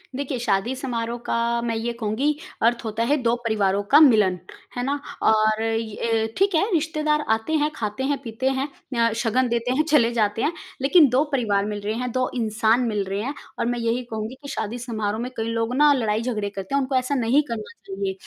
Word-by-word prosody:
देखिए 270 -2 -3
शादी 230 +2 0
समारोह 235 -2 -3
का - - -1 0.3
मैं 230 -1 -2
ये 235 +2 -2
कहूँगी 245 +8 0 0.3
अर्थ 235 +1 +2
होता 220 +1 -1
है - - +5
2 235 0 +2
परिवारों 205 -3 +1
का 295 - +10
मिलन, 210 - +5 0.4
है 245 - -1
ना? 280 +2 -1 0.2
और 215 0 +3
अ, 225 0 -1
ठीक 390 -2 +2
है 315 - +4
रिश्तेदार 305 -1 +1
आते 225 +8 -5
हैं, 300 - +2
खाते 215 +3 -3
हैं, 285 - +1
पीते 245 +3 -1
हैं, 275 +2 -1 0.4
अ, - - -4
शगन 250 +3 +2
देते 235 +1 0
हैं, 305 - +3
चले 290 -7 +3
जाते 215 -1 0
हैं। 320 - +1 0.3
लेकिन 295 +2 +6
2 260 +4 +3
परिवार 205 -7 +1
मिल 210 -1 -3
रहे 210 +2 -2
हैं, 250 - -3
2 255 +1 0
इंसान 225 +1 +2
मिल 210 -3 -1
रहे 195 +2 -3
हैं, 275 +5 -3 0.3
और 235 - +1
मैं 240 0 -1
यही 230 +2 0
कहूँगी 220 +3 -4
कि 280 - -9
शादी 220 0 -3
समारोह 220 -3 -3
में 250 +1 -4
कई 225 0 -2
लोग 230 +2 -1
ना 295 +1 +6
लड़ाई-झगड़े 220 -3 -1
करते 200 +6 -5
हैं, 280 - +3
उनको 265 0 -2
ऐसा 255 +2 +1
नहीं 255 +4 +3
करना 225 +3 -5 0.2
चाहिए। 195 0 -3
230 Hz, 210 wpm, -23 LUFS, 215-265 Hz, 0.4 s, का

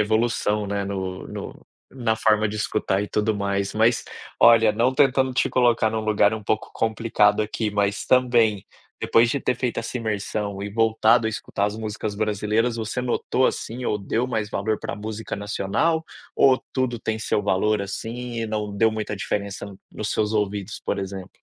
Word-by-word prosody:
evolução, 110 -1 +1
né, 100 0 -2
no 95 -2 -4
no - - -8 0.3
na 120 -4 0
forma 110 -1 +3
de 105 - -5
escutar 105 -2 0
e 105 - -5
tudo 105 0 0
mais. 100 0 -1
Mas, 115 +2 +3 0.4
olha, 115 -2 +7
não 125 +3 +1
tentando 135 -2 +3
te - - +1
colocar 120 -3 +3
num 110 - -1
lugar 110 -1 +3
um 110 -1 -4
pouco 110 +2 -1
complicado 110 -2 +2
aqui, 110 0 -2
mas, 100 0 0
também, 120 -5 +3 0.3
depois 115 +1 +3
de 140 - 0
ter 125 - 0
feito 125 -2 -2
essa 115 +2 -3
imersão 105 -2 -3
e 100 - -4
voltado 110 +1 +3
a - - +2
escutar 100 -1 -2
as 105 +1 -4
músicas 110 -1 -4
brasileiras, 110 +3 0
você 115 +3 -3
notou, 125 +1 0
assim, 120 +2 -3
ou 105 - 0
deu 115 +5 -1
mais 110 -4 -2
valor 110 0 -1
para - - -4
música 110 +1 -5
nacional? 105 +11 0 0.3
Ou 130 -1 +5
tudo 130 -3 -1
tem 110 0 -2
seu 105 - 0
valor, 100 +1 +1
assim, 115 +4 -5
e 115 - -2
não 105 -1 -3
deu 110 +2 +3
muita 110 -1 -3
diferença 100 0 -3
no 100 -2 -11
nos 105 - -4
seus 105 0 0
ouvidos, 105 -2 -2
por - - -2
exemplo? 95 -1 -5
110 Hz, 180 wpm, -23 LUFS, 105-115 Hz, 0.4 s, olha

